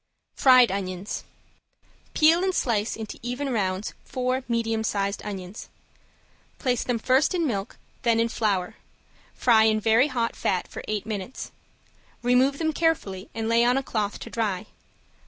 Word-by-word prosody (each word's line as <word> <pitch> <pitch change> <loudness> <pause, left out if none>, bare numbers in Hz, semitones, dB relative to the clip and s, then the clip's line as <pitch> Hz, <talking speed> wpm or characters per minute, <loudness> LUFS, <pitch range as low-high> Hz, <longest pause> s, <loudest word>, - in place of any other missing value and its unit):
~FRIED 255 -4 +6
ONIONS~ 190 0 -4 0.9
Peel 325 +3 +5
and 380 -1 0
slice 220 -4 0
into 215 -2 -7
even 250 +4 -3
rounds 190 -2 -1
four 255 +1 -2
medium 225 -2 0
sized 200 -1 -1
onions. 195 -1 -7 0.9
Place 250 -4 0
them 245 -2 -1
first 260 +9 +2
in 340 -2 +1
milk 205 -6 -3 0.2
then 230 -1 +2
in 230 - +3
flour, 210 -3 -1 0.6
fry 225 -3 +5
in 215 0 +3
very 225 +5 +4
hot 240 -5 -1
fat 185 -2 -1
for - - -8
eight 215 -2 -2
minutes. 215 +3 -5 0.7
Remove 255 +3 +3
them 315 0 0
carefully 230 - -1
and 225 -1 -2
lay 230 +1 +4
on 245 +2 +3
a 270 - 0
cloth 210 -5 -2
to - - -8
dry. 210 -4 -1
230 Hz, 150 wpm, -25 LUFS, 205-255 Hz, 0.9 s, ~FRIED